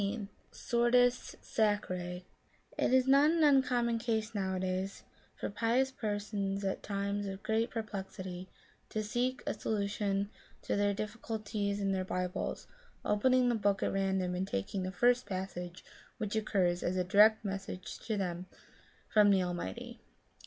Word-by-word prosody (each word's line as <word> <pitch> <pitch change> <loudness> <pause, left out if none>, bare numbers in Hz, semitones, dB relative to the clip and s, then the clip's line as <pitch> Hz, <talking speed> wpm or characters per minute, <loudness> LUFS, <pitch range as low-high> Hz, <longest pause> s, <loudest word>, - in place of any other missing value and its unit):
2SS 200 +1 -2 0.2
SORTES 245 +1 +2
SACRiE 185 -5 -1 0.5
It - - +1
is 260 0 +4
not 280 +3 +6
an 330 0 +3
uncommon 250 -5 +3
case, 225 -1 -1
nowadays, 190 -1 -2 0.3
for - - -4
pious 235 +5 +1
persons 205 -4 -2
at 195 - -1
times 200 0 -2
of 195 0 -6
great 225 +2 +1
perplexity 190 -4 -5 0.4
to 215 - -2
seek 245 +4 -1
a - - 0
solu 210 -1 -1
tion 200 0 -1 0.3
to - - -1
their 205 0 +2
difficulties 210 -1 -3
in 195 -1 0
their 190 -1 0
Bibles, 180 -1 -3 0.4
opening 255 +4 +3
the 240 - +3
book 205 -3 +1
at - - 0
random 190 -2 0
and 185 +2 -2
taking 100 - -2
the 185 0 -3
first 245 +3 +3
passage 185 -2 -5 0.3
which 210 0 -3
occurs 185 -5 +1
as 185 +1 -1
a 180 - +2
direct 210 +4 +5
message 195 -2 -5
to 220 -2 -2
them 180 -2 -3 0.6
from 210 -1 +5
the 190 -2 +4
Almighty. 175 - -5
205 Hz, 145 wpm, -32 LUFS, 190-225 Hz, 0.6 s, not